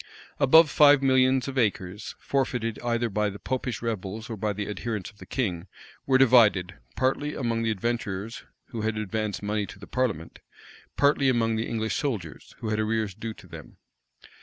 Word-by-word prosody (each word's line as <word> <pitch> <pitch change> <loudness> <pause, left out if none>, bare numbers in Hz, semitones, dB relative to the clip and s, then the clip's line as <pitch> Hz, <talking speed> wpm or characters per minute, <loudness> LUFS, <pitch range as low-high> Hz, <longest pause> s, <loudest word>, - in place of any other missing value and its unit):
Above 155 +4 +7
five 145 -2 +6
millions 130 -1 +3
of 135 -1 -2
acres, 100 -3 -2
forfeited 125 -5 -1
either 120 0 0
by 105 0 0
the 100 - -8
Popish 125 +1 -3
rebels 110 0 -4
or - - -3
by 105 +1 -1
the 100 0 -4
adherents 105 -1 -4
of 105 - -27
the - - -12
king, 95 -8 -2 0.4
were 130 -1 +5
divided, 110 -8 +5 0.2
partly 135 +3 0
among 115 -3 -1
the 115 - 0
adventurers, 110 -1 -3 0.3
who 115 - -5
had 110 0 -1
advanced 110 0 -3
money 105 0 -1
to 100 +1 -11
the 100 - -11
parliament, 110 -12 -2 0.6
partly 140 -1 +3
among 115 -3 +1
the 110 +1 -2
English 110 -1 -2
soldiers, 105 - -4
who 110 - -3
had 110 0 0
arrears 110 -2 -1
due 110 +3 -6
to - - -15
them. - - -12
115 Hz, 175 wpm, -26 LUFS, 105-130 Hz, 0.6 s, Above